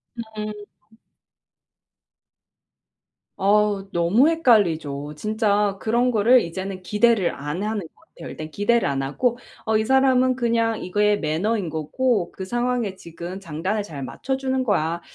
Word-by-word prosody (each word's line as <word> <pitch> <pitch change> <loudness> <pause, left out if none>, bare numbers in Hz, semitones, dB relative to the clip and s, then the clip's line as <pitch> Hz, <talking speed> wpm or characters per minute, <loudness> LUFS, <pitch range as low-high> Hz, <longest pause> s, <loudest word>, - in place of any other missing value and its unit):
음. 215 -2 -6 2.9
어우. 200 0 +2
너무 185 - +3
헷갈리죠. 165 - +1
진짜 210 +1 0
그런 235 +4 +1
거를 240 +2 +5
이제는 185 +2 -5
기대를 210 0 +2
안 145 +3 -5
하는 215 0 -2
것 160 - -12
같아요. 320 - -12
일단 155 0 -7
기대를 205 +6 +1
안 135 -1 -1
하고 240 - 0 0.3
'어 220 0 +3
이 215 - 0
사람은 260 0 +3
그냥 230 -2 0
이게 210 +3 +2
매너인 180 +4 -1
거고 175 - -1
그 190 - -7
상황에 240 -2 -1
지금 170 +1 -8
장단을 190 +4 -3
잘 150 -8 -8
맞춰주는 265 - -2
거야. 170 -7 0
210 Hz, 260 characters per minute, -23 LUFS, 170-235 Hz, 2.9 s, 거를